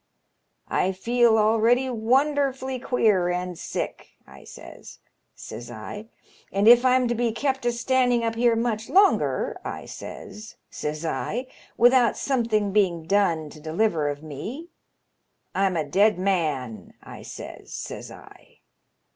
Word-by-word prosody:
'I 190 Hz, -, 0 dB
feel 235 Hz, +3 st, +3 dB
already 225 Hz, +4 st, +3 dB
wonderfully 260 Hz, +2 st, 0 dB
queer 215 Hz, -8 st, +2 dB
and 180 Hz, 0 st, -3 dB
sick,' -, -, -6 dB
I -, -, -15 dB
says, -, -, -12 dB, 0.4 s
says 120 Hz, 0 st, -9 dB
I; 120 Hz, -, -8 dB, 0.2 s
* -, -, -30 dB
and 200 Hz, +2 st, +1 dB
if 240 Hz, +1 st, +8 dB
I*m 255 Hz, -1 st, +3 dB
to 240 Hz, -, 0 dB
be 235 Hz, 0 st, 0 dB
kept 265 Hz, +1 st, -1 dB
a -, -, +3 dB
standing 245 Hz, 0 st, +1 dB
up 230 Hz, 0 st, 0 dB
here 235 Hz, 0 st, +2 dB
much 225 Hz, -1 st, -2 dB
longer,' 395 Hz, +1 st, +2 dB
I -, -, -6 dB
says, 215 Hz, +1 st, -9 dB, 0.2 s
says 150 Hz, +2 st, -4 dB
I, 240 Hz, +9 st, -2 dB, 0.2 s
' -, -, -27 dB
without 245 Hz, 0 st, +4 dB
something 225 Hz, -6 st, 0 dB
being 185 Hz, -5 st, +1 dB
done 165 Hz, -5 st, +1 dB
to 155 Hz, -, -12 dB
deliver 160 Hz, -1 st, 0 dB
of 145 Hz, +1 st, -6 dB
me 210 Hz, -, -7 dB, 0.8 s
I*m 190 Hz, -2 st, +1 dB
a 155 Hz, -, 0 dB
dead 200 Hz, +8 st, +3 dB
man,' 150 Hz, -, -2 dB
I -, -, -11 dB
says, -, -, -10 dB
says -, -, -7 dB
I. -, -, -16 dB
220 Hz, 140 wpm, -24 LUFS, 180-245 Hz, 0.8 s, if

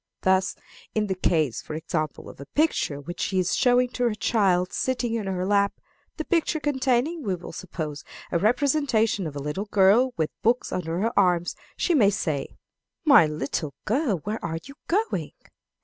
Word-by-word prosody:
Thus, 190 Hz, +1 st, +2 dB, 0.4 s
in 215 Hz, -1 st, +2 dB
the 195 Hz, -, -1 dB
case, 155 Hz, -8 st, +1 dB
for 155 Hz, -, -7 dB
example, 155 Hz, -1 st, -3 dB
of -, -, -12 dB
a 140 Hz, -, -9 dB
picture 295 Hz, -, 0 dB
which 170 Hz, +5 st, -8 dB
she 190 Hz, -, -1 dB
is 180 Hz, -1 st, +1 dB
showing 245 Hz, 0 st, +3 dB
to 245 Hz, -, -3 dB
her 230 Hz, -3 st, +1 dB
child 185 Hz, -5 st, +1 dB
sitting 245 Hz, -3 st, -1 dB
in 220 Hz, -4 st, -2 dB
her 185 Hz, -1 st, -1 dB
lap 200 Hz, 0 st, +2 dB, 0.4 s
the 315 Hz, -, -3 dB
picture 330 Hz, -2 st, +1 dB
containing, 285 Hz, +2 st, 0 dB
we 195 Hz, -8 st, -1 dB
will 175 Hz, -, -9 dB
suppose, 155 Hz, -6 st, -6 dB, 0.3 s
a 170 Hz, -, +1 dB
representation 230 Hz, -, +2 dB
of 145 Hz, -, -7 dB
a 140 Hz, -, -4 dB
little 150 Hz, +8 st, -3 dB
girl 210 Hz, +6 st, +4 dB
with 160 Hz, -1 st, 0 dB
books 240 Hz, +2 st, +1 dB
under 165 Hz, -2 st, -2 dB
her 230 Hz, +3 st, 0 dB
arm 180 Hz, -3 st, +3 dB, 0.3 s
she 355 Hz, -, +1 dB
may 225 Hz, -10 st, +5 dB
say, 155 Hz, -8 st, -2 dB, 0.6 s
"My 280 Hz, -, +7 dB
little 150 Hz, -1 st, -3 dB
girl, 240 Hz, -, +1 dB
where 215 Hz, +2 st, -4 dB
are 165 Hz, -1 st, -2 dB
you 275 Hz, -, -10 dB
going? 425 Hz, +6 st, -1 dB
200 Hz, 180 wpm, -25 LUFS, 170-250 Hz, 0.6 s, My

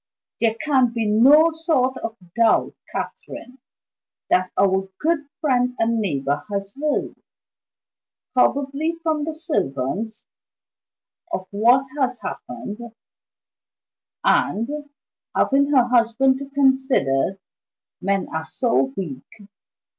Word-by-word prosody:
"There 225 Hz, -1 st, +2 dB
can 260 Hz, -5 st, +3 dB
be 230 Hz, -2 st, -1 dB
no 275 Hz, +10 st, +6 dB
sort 315 Hz, -6 st, 0 dB
of 225 Hz, 0 st, -5 dB, 0.2 s
doubt, 230 Hz, -1 st, +3 dB, 0.2 s
Catherine, 255 Hz, +1 st, -7 dB, 0.7 s
that 185 Hz, 0 st, +3 dB
our 190 Hz, 0 st, +2 dB
good 310 Hz, -2 st, 0 dB
friend 250 Hz, -5 st, +1 dB
and 230 Hz, 0 st, +1 dB
neighbor 145 Hz, -7 st, -1 dB
has 200 Hz, 0 st, -3 dB
heard, 295 Hz, +1 st, -2 dB, 1.1 s
probably 280 Hz, +5 st, +1 dB
from 310 Hz, -3 st, 0 dB
the 320 Hz, -1 st, -4 dB
servants, 220 Hz, -, -2 dB, 1.1 s
of 185 Hz, -, -3 dB
what 240 Hz, +6 st, +4 dB
has 255 Hz, -2 st, 0 dB
happened; 210 Hz, +2 st, -7 dB, 1.4 s
and 290 Hz, +7 st, +1 dB, 0.5 s
(having 280 Hz, +1 st, +3 dB
her 270 Hz, -4 st, +5 dB
husband 250 Hz, +2 st, +3 dB
to 280 Hz, 0 st, -7 dB
consider 265 Hz, -, +2 dB, 0.6 s
men 195 Hz, 0 st, 0 dB
are 160 Hz, 0 st, -2 dB
so 135 Hz, -, 0 dB
weak!) 155 Hz, -9 st, -4 dB
245 Hz, 100 wpm, -22 LUFS, 200-280 Hz, 1.4 s, no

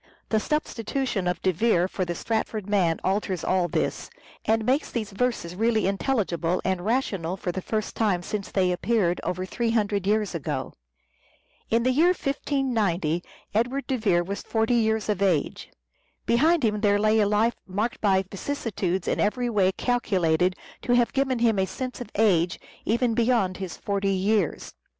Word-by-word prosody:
The 220 Hz, -, +2 dB
substitution 245 Hz, -, -2 dB
of 180 Hz, -1 st, -2 dB
De 185 Hz, -, +3 dB
Vere 180 Hz, -1 st, +2 dB
for 190 Hz, -1 st, -3 dB
the 175 Hz, 0 st, -3 dB
Stratford 220 Hz, 0 st, -2 dB
man 185 Hz, -5 st, +2 dB
alters 190 Hz, -2 st, -1 dB
all 185 Hz, -2 st, +1 dB
this, -, -, -2 dB, 0.4 s
and 220 Hz, 0 st, +2 dB
makes 265 Hz, +5 st, +1 dB
these 220 Hz, -4 st, -3 dB
verses 195 Hz, -5 st, -2 dB
really 220 Hz, +2 st, +1 dB
intelligible 190 Hz, -5 st, 0 dB
and 185 Hz, -2 st, 0 dB
rational 195 Hz, -6 st, -1 dB
for 180 Hz, -, -3 dB
the 190 Hz, -, -4 dB
first 215 Hz, +2 st, -3 dB
time 200 Hz, -6 st, +1 dB
since 200 Hz, +2 st, -4 dB
they 185 Hz, -2 st, +1 dB
appeared 180 Hz, -1 st, +1 dB
— -, -, -30 dB
over 185 Hz, +1 st, -2 dB
three 235 Hz, +5 st, -2 dB
hundred 205 Hz, -4 st, 0 dB
years 210 Hz, -1 st, +1 dB
ago. 165 Hz, -5 st, -3 dB, 1.0 s
In 230 Hz, +1 st, +2 dB
the 255 Hz, -, +3 dB
year 340 Hz, +7 st, +4 dB
1590 220 Hz, -, -1 dB, 0.3 s
Edward 245 Hz, +6 st, 0 dB
de 265 Hz, -, -1 dB
Vere 190 Hz, -7 st, +2 dB
was 200 Hz, +3 st, -4 dB
forty 225 Hz, +1 st, 0 dB
years 220 Hz, -2 st, +1 dB
of 205 Hz, -3 st, -1 dB
age. 180 Hz, -7 st, 0 dB, 0.6 s
Behind 310 Hz, +6 st, +3 dB
him 210 Hz, -1 st, 0 dB
there 205 Hz, -2 st, +3 dB
lay 215 Hz, +1 st, +3 dB
a 205 Hz, -, +3 dB
life 215 Hz, +3 st, +2 dB
marked 210 Hz, +5 st, -2 dB
by 195 Hz, -2 st, +3 dB
vicissitudes 195 Hz, -3 st, -3 dB
in -, -, 0 dB
every 240 Hz, +3 st, 0 dB
way 195 Hz, -3 st, +3 dB
calculated 185 Hz, -7 st, +1 dB, 0.3 s
to 245 Hz, -, +1 dB
have 240 Hz, -1 st, +2 dB
given 270 Hz, -2 st, +1 dB
him 230 Hz, -3 st, +2 dB
a 190 Hz, -, +1 dB
sense 250 Hz, +7 st, -5 dB
of 245 Hz, -, -6 dB
age 185 Hz, -5 st, +2 dB, 0.3 s
even 235 Hz, +2 st, +1 dB
beyond 225 Hz, -5 st, +1 dB
his 190 Hz, -3 st, -6 dB
forty 200 Hz, -1 st, -1 dB
years. 195 Hz, -2 st, 0 dB
210 Hz, 170 wpm, -25 LUFS, 185-235 Hz, 1.0 s, year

